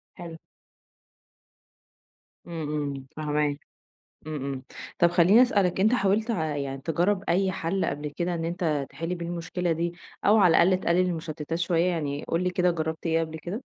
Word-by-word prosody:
حلو. 170 -3 -8 2.1
إمم، 165 -2 -5 0.2
إمم، 135 -1 -5
فاهماك، 150 -1 0 0.7
إمم، 155 - -4
إمم، 135 -1 -4 0.4
طب 175 - +6
خلّيني 180 +7 +6
اسألك 200 -8 +2
أنت 215 +5 +4
حاولت 215 +1 +1
ع 160 -7 -1
يعني 135 -1 -4
تجرّب 180 +6 0
أي 190 +2 +2
حَل 185 +3 -1
قبل 145 +1 -3
كده 175 0 -1
إن 165 -1 -2
أنت 165 -5 -1
تحل 165 +2 -4
بيه 170 - -5
المشكلة 175 0 -2
دي، 170 +1 -1 0.3
أو 215 +2 +6
على 180 -5 +6
الأقل 185 +1 +3
تقلّل 170 +1 +2
المشتّتات 165 -1 -4
شوية؟ 170 0 +2
يعني 145 -4 -2
قُل 170 +2 0
لي 180 - +1
كده 180 -1 +2
جرّبت 160 0 -4
إيه 165 0 +2
قبل 160 -1 -3
كده؟ 175 +3 -7
170 Hz, 165 wpm, -26 LUFS, 155-180 Hz, 2.1 s, طب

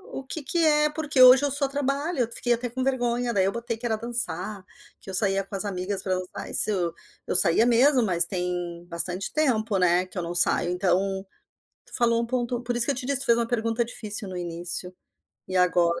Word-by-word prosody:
o - - -4
que 290 +3 -7
que 340 - -2
é, 300 -1 +3
porque 300 -3 -1
hoje 255 +2 +8
eu - - 0
só 280 0 +2
trabalho. 285 +3 -3
Eu 235 0 -2
fiquei 240 0 -1
até 240 +1 -3
com 255 +2 -4
vergonha, 245 -2 -1
daí 190 -2 +2
eu 195 - 0
botei 235 0 -4
que 240 - -9
era 220 -2 0
dançar, 230 -3 -2 0.4
que - - -14
eu - - -6
saía 195 0 0
com 195 - -8
as 195 - -4
amigas 190 0 -3
para 185 -1 -1
dançar, 185 0 -7
e - - -9
se - - +5
eu 175 -4 -2 0.3
Eu - - -1
saía 180 +4 +7
mesmo, 250 +2 +3
mas 175 -5 +2
tem 175 -1 -4
bastante 180 +3 -1
tempo, 230 -9 0
né, 180 0 +2
que 185 - -13
eu - - -1
não 170 +1 -5
saio. 175 - +3
Então, 190 +1 -1 0.6
tu - - -14
falou 235 -1 +1
um - - -3
ponto 240 0 -2
por 245 0 -3
isso 240 - +4
que 280 - +1
eu - - -6
te 255 - -4
disse, 275 -1 +2
fez 235 -2 +3
uma 235 - 0
pergunta 230 0 -1
difícil 215 -2 -6
no 185 - -7
início, 175 +1 -4 0.6
e 185 - -3
agora 175 -1 +2
225 Hz, 235 wpm, -25 LUFS, 185-250 Hz, 0.6 s, hoje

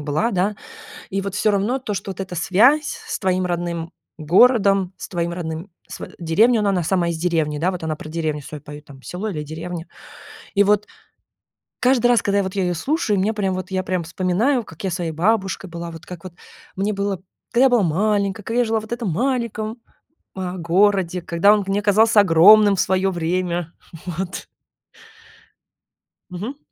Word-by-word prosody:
была, 150 +11 0
да. 195 +2 0 0.5
И 195 - -2
вот 200 0 -5
всё 215 0 +2
равно 205 +6 0
то, 230 -5 -4
что 195 0 -4
вот 185 - -11
эта 190 -1 -6
связь 220 - +4 0.2
с - - -3
твоим 185 -2 0
родным 170 -1 -3 0.3
городом, 195 - +4
с - - -8
твоим 170 -1 -2
родным 165 +1 -5 0.2
св - - -8
деревней, 215 +9 +3
ну, 205 - +1
она - - +3
на 180 -3 0
сама 175 0 +1
из 170 - -3
деревни. 160 -3 0
Да 175 +4 +1
вот 180 -3 -6
она 160 -1 -2
про - - -9
деревню 155 -2 -2
свою 145 0 -9
поет 145 0 -10
там, 135 -2 -14
село 180 +9 -5
или 155 -6 -4
деревня. 165 +3 -6 0.7
И 200 - +5
вот 210 +1 +2 0.9
каждый 250 -1 +3
раз, 240 -3 +4
когда 200 0 +1
я 200 - +1
вот 190 - -5
я 195 - 0
ее 180 -1 0
слушаю, 250 - 0
мне 205 +4 +1
прям 195 -3 -1
вот 185 +1 -5
я 185 0 0
прям 185 -2 -2
вспоминаю, 190 - 0
как 165 -1 -12
я 190 - 0
с - - -2
своей 175 -3 -3
бабушкой 190 +2 0
была. 170 0 -6
Вот 165 -1 -11
как 180 -2 -9
вот 180 - -9 0.4
мне 200 +3 0
было 200 -2 -2 0.3
да 235 - +3
я 265 - +7
была 245 -3 +3
маленькой, 200 +4 0
когда 230 +3 0
я - - +3
жила 225 -1 0
в - - -10
этом 235 -5 -2
маленьком, 230 - -2 0.6
э, 185 -1 -3
городе, 185 +1 +2
когда 170 +4 +3
он 205 -2 0
мне 195 +1 0
казался 215 +1 +5
огромным 200 +3 +6
в - - 0
свое 190 +1 +1
время. 175 -1 -2 0.3
Вот. 180 +1 -5 1.8
Мгм. 205 +10 -6
190 Hz, 195 wpm, -21 LUFS, 170-210 Hz, 1.8 s, я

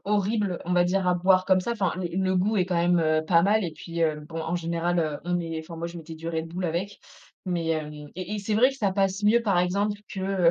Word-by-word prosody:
horribles, 205 -2 0
on 180 - -2
va 175 0 +4
dire, 185 +1 0
à 180 - +4
boire 185 +1 +3
comme 185 -1 +4
ça. 235 - -2
Enfin, 200 -6 0
le 185 -2 -3
le 190 0 +1
goût 205 +4 +1
est 185 - +3
quand 180 -1 -2
même, 175 +1 +3
heu, 155 -1 +2
pas 170 0 +5
mal 210 +2 +3
et 170 - -3
puis, 165 +2 -4
heu, 155 -1 +1
bon, 165 +1 -5
en 165 +2 -2
général, 170 +1 -1
heu, 155 -3 -1
on 175 0 0
est 165 -1 -4
enfin, 165 +1 -10
moi 170 +1 -3
je 170 0 -8
mettais 160 0 -9
du 165 +1 -6
Red 160 0 -3
Bull 180 +2 -4
avec, 180 +5 -2 0.5
mais 175 -3 -2
hem, 155 -2 -1 0.2
et 185 +3 -5
et 210 - -2
c'est 205 +1 -2
vrai 250 +5 +5
que 270 - -10
ça 205 -7 +1
passe 195 +1 0
mieux, 230 +3 +4
par 200 -5 +2
exemple, 200 +4 0
que, 190 -2 +1
180 Hz, 275 wpm, -26 LUFS, 165-195 Hz, 0.5 s, pas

